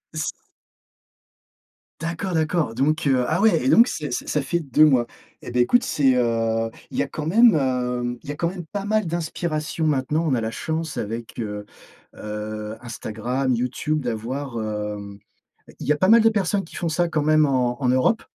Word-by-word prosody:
S 155 Hz, -1 st, -1 dB, 1.7 s
D'accord, 170 Hz, +3 st, -3 dB
d'accord, 155 Hz, -5 st, 0 dB
donc 155 Hz, +5 st, +1 dB
heu, 130 Hz, -2 st, +3 dB
ah 160 Hz, -, +1 dB
ouais 220 Hz, +1 st, +4 dB
et 265 Hz, -, +3 dB
donc 235 Hz, -3 st, +7 dB
c'est 150 Hz, -3 st, -4 dB
ç -, -, -3 dB
ça 150 Hz, -, 0 dB
fait 170 Hz, +5 st, -1 dB
2 150 Hz, 0 st, +3 dB
mois 130 Hz, -5 st, +4 dB, 0.4 s
et -, -, -8 dB
beh 125 Hz, 0 st, +2 dB
écoute, 245 Hz, -, +3 dB
c'est, 135 Hz, -3 st, +2 dB
heu, 115 Hz, -2 st, +1 dB, 0.2 s
il -, -, -6 dB
y -, -, +3 dB
a -, -, -5 dB
quand 150 Hz, -, -5 dB
même, 220 Hz, +4 st, +6 dB
hem, 125 Hz, -3 st, -1 dB
il -, -, -10 dB
y -, -, 0 dB
a -, -, -5 dB
quand 170 Hz, +3 st, 0 dB
même 180 Hz, -2 st, -7 dB
pas 195 Hz, +5 st, -5 dB
mal 215 Hz, -1 st, +1 dB
d'inspiration 160 Hz, -1 st, -2 dB
maintenant, 150 Hz, +2 st, +1 dB
on 140 Hz, -, +1 dB
a 115 Hz, -, +1 dB
la 110 Hz, -, -2 dB
chance 160 Hz, +6 st, -3 dB
avec, 115 Hz, +3 st, -5 dB
heu 105 Hz, -2 st, -4 dB, 0.5 s
heu, 105 Hz, 0 st, -5 dB
Instagram, 125 Hz, +3 st, -2 dB
YouTube 130 Hz, +5 st, -1 dB
d'avoir, 125 Hz, +2 st, -4 dB
hem, 105 Hz, -1 st, -5 dB, 0.6 s
il -, -, -6 dB
y 150 Hz, -, +4 dB
a -, -, 0 dB
pas 185 Hz, +5 st, +2 dB
mal 230 Hz, +1 st, +8 dB
de 225 Hz, -, +5 dB
personnes 200 Hz, -2 st, 0 dB
qui -, -, -12 dB
font 170 Hz, -, -2 dB
ça, 170 Hz, +2 st, +1 dB
quand 155 Hz, -3 st, 0 dB
même 155 Hz, 0 st, +4 dB
en 125 Hz, -1 st, 0 dB
en 125 Hz, -, +2 dB
Europe. 130 Hz, -, +2 dB
140 Hz, 200 wpm, -23 LUFS, 120-165 Hz, 1.7 s, mal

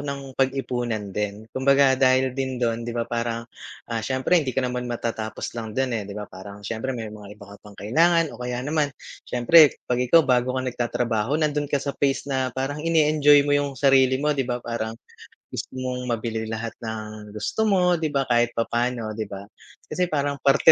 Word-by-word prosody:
nang 140 Hz, -2 st, -5 dB
pag-ipunan 120 Hz, -6 st, -1 dB
din, 105 Hz, +1 st, -3 dB
kumbaga 135 Hz, 0 st, +4 dB
dahil 130 Hz, 0 st, +4 dB
din 130 Hz, -1 st, -3 dB
dun, 115 Hz, -1 st, 0 dB
‘di -, -, -3 dB
ba, 115 Hz, -, 0 dB
parang, 115 Hz, 0 st, -3 dB, 0.5 s
ah, 115 Hz, -, -1 dB
siyempre 130 Hz, +9 st, +2 dB
hindi 130 Hz, -3 st, -4 dB
ka 130 Hz, -, +2 dB
naman 125 Hz, 0 st, -3 dB
matatapos 115 Hz, -2 st, -4 dB
lang 110 Hz, -1 st, -6 dB
dun 130 Hz, -2 st, 0 dB
eh, 105 Hz, -3 st, -3 dB
‘di 100 Hz, -, -7 dB
ba, 105 Hz, -, -4 dB
parang 100 Hz, +2 st, -11 dB
siyempre 115 Hz, +4 st, -3 dB
may 110 Hz, -2 st, -6 dB
mga 105 Hz, -1 st, -11 dB
iba 100 Hz, -1 st, -13 dB
ka -, -, -11 dB
pang 105 Hz, -1 st, -15 dB
kailangan 165 Hz, +8 st, +2 dB
o 120 Hz, -, -12 dB
kaya 125 Hz, +1 st, -3 dB
naman 150 Hz, 0 st, +1 dB, 0.4 s
siyempre 145 Hz, +5 st, +6 dB
'pag 125 Hz, 0 st, 0 dB
ikaw 165 Hz, +2 st, +6 dB
bago 125 Hz, 0 st, +2 dB
ka 130 Hz, -, -1 dB
nagtatrabaho, 120 Hz, +1 st, -1 dB
nandun 150 Hz, -2 st, 0 dB
ka 145 Hz, -, +1 dB
sa 140 Hz, 0 st, -3 dB
phase 140 Hz, -1 st, +1 dB
na 130 Hz, -2 st, -1 dB
parang 145 Hz, +3 st, -2 dB
ine-enjoy 150 Hz, -3 st, +4 dB
mo 145 Hz, -, +1 dB
yung 145 Hz, 0 st, +2 dB
sarili 130 Hz, -1 st, +4 dB
mo, 150 Hz, +2 st, +1 dB
‘di 135 Hz, -2 st, -1 dB
ba, 120 Hz, -, 0 dB
parang 115 Hz, -1 st, -3 dB, 0.6 s
gusto -, -, -6 dB
mong 125 Hz, -1 st, -4 dB
mabili 115 Hz, -1 st, -2 dB
lahat 110 Hz, 0 st, -4 dB
ng 110 Hz, -2 st, -7 dB
gusto 220 Hz, -, -1 dB
mo, 180 Hz, -4 st, +3 dB
‘di 160 Hz, -, 0 dB
ba, 140 Hz, -2 st, 0 dB
kahit 120 Hz, -1 st, +1 dB
papaano, 120 Hz, -1 st, -1 dB
‘di 110 Hz, -1 st, -4 dB
ba? 100 Hz, 0 st, -8 dB, 0.5 s
Kasi 180 Hz, -1 st, 0 dB
parang 145 Hz, -2 st, -1 dB
parte 140 Hz, +3 st, +6 dB
125 Hz, 195 wpm, -24 LUFS, 115-140 Hz, 0.6 s, siyempre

